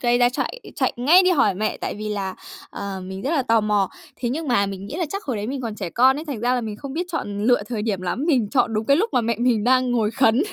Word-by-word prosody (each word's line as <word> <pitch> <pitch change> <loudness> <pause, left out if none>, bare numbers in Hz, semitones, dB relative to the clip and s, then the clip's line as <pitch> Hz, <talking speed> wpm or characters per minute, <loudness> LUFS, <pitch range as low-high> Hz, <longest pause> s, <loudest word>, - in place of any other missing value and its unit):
gây 240 0 +2
ra, 245 0 +5
chạy - - -3 0.2
chạy - - +1
ngay 310 +10 +6
đi 370 - +3
hỏi 240 - +3
mẹ, 215 +3 -1
tại - - -4
vì 215 +1 -5
là, 195 -2 -3 0.4
à, 200 -1 -5
mình 190 +1 -7
rất 275 - -1
là 295 -5 +2
tò 225 -2 +3
mò. 205 -2 +1 0.3
Thế 240 - -2
nhưng 300 +4 -3
mà 200 -5 +3
mình 195 0 -6
nghĩ 250 - -7
là 355 - 0
chắc 395 +4 -5
hồi 255 -6 -2
đấy 205 +1 -3
mình 265 +1 -3
còn 225 -3 -4
trẻ 185 -5 -5
con 260 +3 +4
ấy, 310 - -6
thành 275 -8 -5
ra 245 +1 +2
là 250 - 0
mình 215 -2 -5
không 275 +2 -7
biết 350 +4 -2
chọn 205 -9 -3
lựa 245 -4 +4
thời 230 -4 -3
điểm 205 -4 -1
lắm, 185 - -2
mình 250 -11 +2
chọn 235 -4 +2
đúng 215 +1 -1
cái 280 - +5
lúc 435 +8 +1
mà 250 - +3
mẹ 230 0 -1
mình 235 -4 +2
đang 255 0 +3
ngồi 225 -3 +1
khấn. 240 +2 +3
240 Hz, 300 wpm, -22 LUFS, 210-270 Hz, 0.4 s, ngay